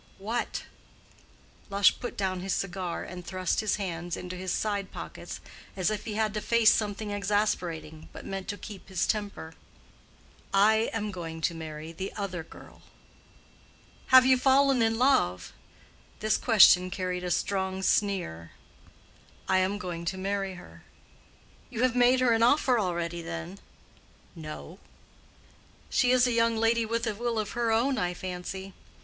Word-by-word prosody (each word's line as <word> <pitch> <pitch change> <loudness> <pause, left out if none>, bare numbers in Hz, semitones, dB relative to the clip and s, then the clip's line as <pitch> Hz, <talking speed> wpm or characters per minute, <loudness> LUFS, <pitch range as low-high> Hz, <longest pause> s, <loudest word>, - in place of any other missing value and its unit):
"What?" 225 +5 -3 1.1
Lush 200 -1 +4
put 245 - -6
down 190 -2 -1
his 190 0 -1
cigar 185 -2 -3
and 180 -1 -8
thrust 185 0 -1
his 215 -2 +1
hands 175 -4 -4
into 180 0 -6
his 185 0 -4
side 205 -3 -1
pockets, - - -8 0.4
as 185 +2 +1
if 210 -1 -4
he 215 -2 -4
had 215 -1 0
to 210 - -2
face 230 -1 +5
something 210 0 -2
exasperating, 185 -7 -2
but - - -10
meant 195 -1 -5
to 205 -2 -4
keep 205 -2 -10
his 185 -2 0
temper. 205 -6 -3 1.0
"I 220 +3 +4
am 210 -2 -3
going 165 -3 -6
to 170 - +1
marry 160 -1 -7
the 190 +4 -5
other 195 -4 -4
girl." - - -15 1.3
"Have 260 -1 +8
you 260 -1 +5
fallen 270 -1 +4
in 225 0 +2
love?" 90 - +2 0.7
This 215 0 +1
question 190 -5 +6
carried 180 -1 -3
a 180 - -2
strong 190 +1 -1
sneer. 180 - 0 0.9
"I 190 0 +3
am 190 +2 0
going 175 -4 -5
to 190 +2 -2
marry 195 0 -2
her." 180 - -14 0.9
"You 245 -1 -2
have 255 -1 +2
made 250 +1 +4
her 250 -2 +4
an 225 - +1
offer 250 0 +4
already, 175 -3 -2
then?" 170 +3 -6 0.8
"No." 160 +3 -9 1.1
"She 250 - +3
is 250 0 +5
a 250 - +1
young 230 -1 +2
lady 225 0 +2
with 230 +1 -1
a 220 - -1
will 235 +2 -2
of 215 -1 -2
her 235 -1 0
own, 245 +3 +2
I 180 -2 -1
fancy. 185 +1 -6
200 Hz, 155 wpm, -28 LUFS, 180-225 Hz, 1.3 s, Have